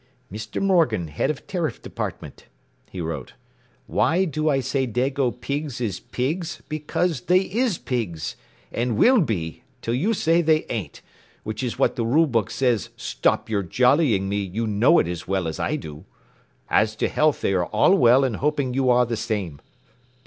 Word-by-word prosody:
“Mr. 110 +1 -5
Morgan, 160 - +2
Head 75 - -1
of 150 - -4
Tariff 165 -9 -2
Department,” - - -7 0.4
he 95 - -8
wrote. 80 -6 -5 0.5
“Why 180 +4 +2
do 155 -1 -1
I 135 -2 +2
say 130 +1 -1
dago 130 +3 0
pigs 140 +2 -4
is 110 -6 -2
pigs 155 +8 -3
because 155 0 -1
they 180 +7 +3
is 215 +1 0
pigs 105 -11 -3 0.4
and 120 -2 -1
will 250 - +5
be 90 - -3 0.2
til 115 - -1
you 190 - +1
say 165 -1 +3
they 155 -1 +2
ain't 95 -11 -5 0.4
which 110 +3 -4
is 125 -3 -3
what - - +1
the 120 - 0
rule 145 +9 +4
book 115 -7 0
says 120 -2 0
stop - - 0
your 105 -3 0
jollying 125 - +2
me 100 +1 -1
you 100 +3 -2
know 110 +10 +4
it - - +3
as 85 -1 -5
well 95 -3 0
as 80 - -5
I - - 0
do. 75 -1 -8 0.6
As 110 0 +2
to - - 0
health 155 -1 +1
they 95 - +1
are 90 -2 +1
all 110 - +4
well 130 -5 +5
and 125 -6 0
hoping 140 -3 0
you 130 0 +1
are 125 0 +5
the 115 0 -2
same. 100 -9 -3
125 Hz, 180 wpm, -23 LUFS, 105-155 Hz, 0.6 s, will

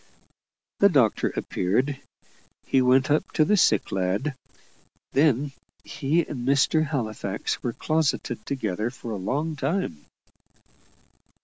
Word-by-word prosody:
The 200 - +6
doctor 125 - +2
appeared; 125 +10 -1 0.6
he 135 - +3
went 130 +2 +3
up 150 - +1
to 155 - +3
the 210 - +3
sick 115 - +3
lad; 95 +10 -1 0.8
then 140 -1 +2 0.3
he 155 +4 0
and 140 - -6
Mr. 140 +3 +3
Halifax 110 -8 -3
were 120 - -2
closeted 145 -7 -1
together 110 -5 -2
for 120 -2 -8
a 105 - -3
long 145 +11 -2
time. 140 - -2
135 Hz, 115 wpm, -25 LUFS, 110-150 Hz, 0.8 s, The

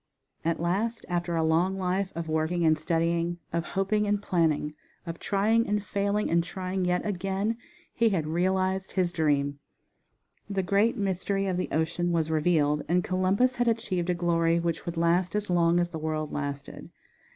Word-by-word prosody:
At 165 0 0
last 200 +7 -1
after 175 -1 -1
a 165 - +1
long 170 +4 +2
life 190 +1 -1
of 170 -1 -4
working 160 +2 0
and 155 0 +5
studying, 170 +2 0 0.2
of 170 0 0
hoping 210 +2 +1
and 205 0 +1
planning, 160 -6 0 0.3
of 165 -1 -6
trying 220 +3 +2
and 205 0 0
failing, 200 +1 0
and 170 0 +3
trying 185 +1 -3
yet 180 0 0
again, 195 +2 -1 0.4
he 230 -1 +3
had 175 -7 0
realized 185 +3 0
his 180 -2 +1
dream. 145 -4 0 0.9
The 195 -2 -1
great 205 +6 +2
mystery 195 0 -1
of 185 -2 -1
the 180 - -2
ocean 170 +2 0
was 160 -2 0
revealed, 150 -2 +2
and 180 +1 +3
Columbus 195 +8 +1
had 245 0 +1
achieved 185 -6 0
a 180 - +2
glory 170 -1 +2
which 170 +1 -2
would 170 0 -4
last 170 +3 +2
as 210 -3 -1
long 170 0 +3
as 175 0 0
the 160 - -5
world 155 -1 -2
lasted. 145 -1 -5
175 Hz, 175 wpm, -27 LUFS, 165-195 Hz, 0.9 s, and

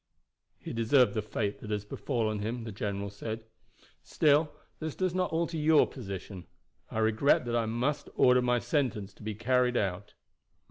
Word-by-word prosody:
"He - - -7
deserved 120 +3 +4
the 110 - 0
fate 105 -1 -3
that 105 - -9
has 105 -1 -2
befallen 110 -1 -2
him," 115 +3 -3
the 110 - -6
general 100 0 -3
said. 110 +2 -6 0.6
"Still 150 0 +3 0.3
this 160 -1 -4
does 185 -2 0
not 185 -1 0
alter 165 0 -1
your 155 0 +5
position. 95 -6 -8 0.4
I - - -6
regret 110 +5 +3
that 120 0 -1
I 115 -1 +1
must 125 +6 -1
order 125 0 +5
my 125 0 +2
sentence 115 -8 -1
to - - -19
be 110 0 -4
carried 125 +2 +2
out." 100 +1 -2
115 Hz, 170 wpm, -30 LUFS, 105-140 Hz, 0.6 s, your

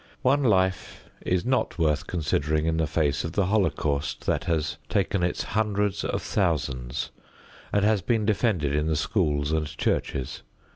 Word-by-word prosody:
One 140 +3 +4
life 95 -5 0
is 90 +2 0
not 130 -5 0
worth 75 -3 +1
considering 75 -2 0
in 80 0 +1
the 80 -1 +1
face 75 -2 0
of 80 - -4
the 100 -1 +2
holocaust 80 -8 0
that - - 0
has 80 0 -1
taken 100 -2 +1
its 90 0 0
hundreds 105 -1 0
of - - -2
thousands 65 0 -1 0.6
and 100 0 +2
has 105 -2 +3
been 110 +2 +1
defended 100 - +1
in 75 +1 +1
the 80 - +1
schools 75 -3 0
and 80 -1 0
churches. 65 - -1
85 Hz, 155 wpm, -26 LUFS, 75-100 Hz, 0.6 s, One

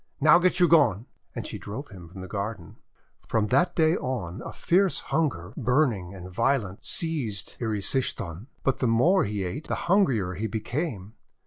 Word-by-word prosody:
Now 155 +4 +7
get 180 0 +2
you 175 - +6
gone!' 120 - +4 0.3
And - - -4
she - - -5
drove 130 +8 -7
him 90 -5 -12
from 95 +2 -10
the 95 - -7
garden. 100 -4 -5 0.5
From 110 -2 +1
that 175 0 +2
day 160 0 +4
on 115 - -4
a - - -7
fierce 190 +1 +2
hunger, 105 - -1
burning 120 - +1
and 90 -1 -9
violent, 110 0 -1
seized 135 - -2
Erysichthon. 105 - -1 0.2
But 135 - +1
the 125 - +1
more 130 +13 +4
he 100 -1 -2
ate 130 - -5
the - - -1
hungrier 130 - +2
he 105 +5 -3
became. 110 - -4
115 Hz, 170 wpm, -26 LUFS, 95-155 Hz, 0.5 s, Now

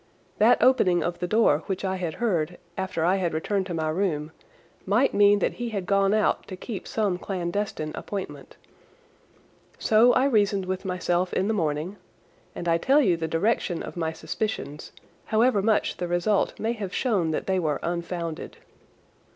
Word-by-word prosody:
That - - +6
opening 185 -9 +4
of 175 0 -3
the 180 - -2
door 215 -7 +3
which 190 0 -3
I 190 0 -1
had 175 -3 -3
heard 175 -8 -1 0.2
after 185 -4 -2
I 185 +3 +3
had 175 -4 -1
returned 195 +4 -1
to 180 - -4
my 160 -1 -1
room 155 -3 -1 0.5
might 225 +8 +2
mean 205 0 +5
that - - 0
he 240 - -2
had 200 -4 -3
gone 195 +1 +2
out 215 0 +1
to 185 - -6
keep 210 0 -6
some 200 -5 -1
clandestine 180 -4 -3
appointment. 200 -2 -7 1.2
So 225 +3 +5
I 260 - +3
reasoned 205 -6 +2
with 185 +1 -4
myself 180 -1 0
in 190 - +1
the 220 - +1
morning, 165 +1 -2 0.6
and 175 - -5
I 165 0 +3
tell 275 - +4
you 190 -12 +3
the 165 -1 -3
direction 170 +1 0
of - - -8
my 165 -2 -1
suspicions, 160 -4 -4 0.3
however 220 -1 +3
much 215 +1 +1
the 175 - -3
result 175 +4 0
may 225 +2 0
have 205 -5 -5
shown 200 -10 +1
that 155 - -2
they 190 -1 +1
were 155 -4 -1
unfounded. 170 -1 -4
185 Hz, 175 wpm, -25 LUFS, 170-210 Hz, 1.2 s, That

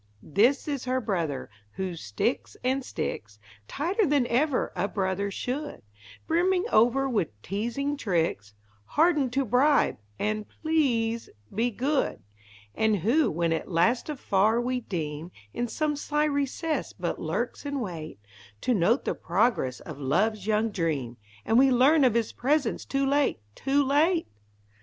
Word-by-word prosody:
This 240 - +2
is 280 -4 -3
Her 255 0 +1
brother, 170 - -2 0.3
who 185 -2 -3
sticks 160 - -2
and 260 +2 +1
sticks 105 - -5 0.3
Tighter 360 +9 0
than 285 -3 +3
even 255 +3 +1
a 185 +2 0
brother 195 0 -1
should; 265 +9 -4 0.4
Brimming 360 +3 +2
over 245 +5 +4
with 175 - -2
teasing 240 +8 -2
tricks, 165 - -1 0.3
Hardened 300 - +2
to 275 0 +1
bribe 265 +6 +3 0.2
and 215 0 -2 0.2
"please 235 -8 +1 0.2
be 230 +4 +1
good"; 265 +6 -1 0.5
And 220 -1 +2
who, 235 - +2
when 165 +1 0
at 160 - -3
last 225 - +2
afar 220 -5 +2
we 250 +1 -1
deem, 160 -5 -4 0.2
In 240 - -2
some 295 +6 -1
sly 295 +1 0
recess 290 +2 -1
but - - -4
lurks - - -3
in 285 -1 -3
wait 165 - -6 0.4
To 250 - +1
note 220 +6 +2
the - - 0
progress 175 - 0
of 155 -3 -9
love's 195 +9 0
young 220 +1 +1
dream 150 - -2 0.3
And 225 - +4
we 270 +1 +6
learn 270 +5 +5
of 245 -4 +4
his 230 -2 +1
presence 275 -1 0
too 275 0 0
late, 280 - +2
too 275 - +1
late! 320 +5 +3
240 Hz, 145 wpm, -27 LUFS, 190-280 Hz, 0.5 s, we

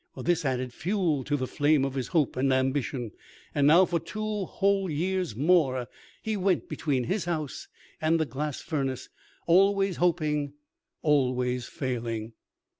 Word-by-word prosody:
This 175 -3 0
added 130 -2 -1
fuel 170 - 0
to 145 0 0
the 130 - -2
flame 145 +1 +2
of 135 - -3
his 130 -3 -3
hope 160 -6 +1
and 135 +1 +1
ambition. 130 -2 0 0.4
And 145 -1 +3
now, 170 +5 +7
for 175 -1 0
two 210 +4 -3
whole 195 0 +1
years 180 - -1
more, 135 -4 +2 0.4
he 220 -1 -1
went 190 -3 +1
between 135 -5 -1
his 190 - -1
house 155 -5 -3 0.3
and 160 +1 +2
the 160 - +2
glass 145 +2 -4
furnace, 135 -5 -3 0.4
always 195 +2 +3
hoping, 150 -5 +1 0.5
always 125 -4 +1
failing. 115 -3 -4
150 Hz, 145 wpm, -28 LUFS, 130-175 Hz, 0.5 s, now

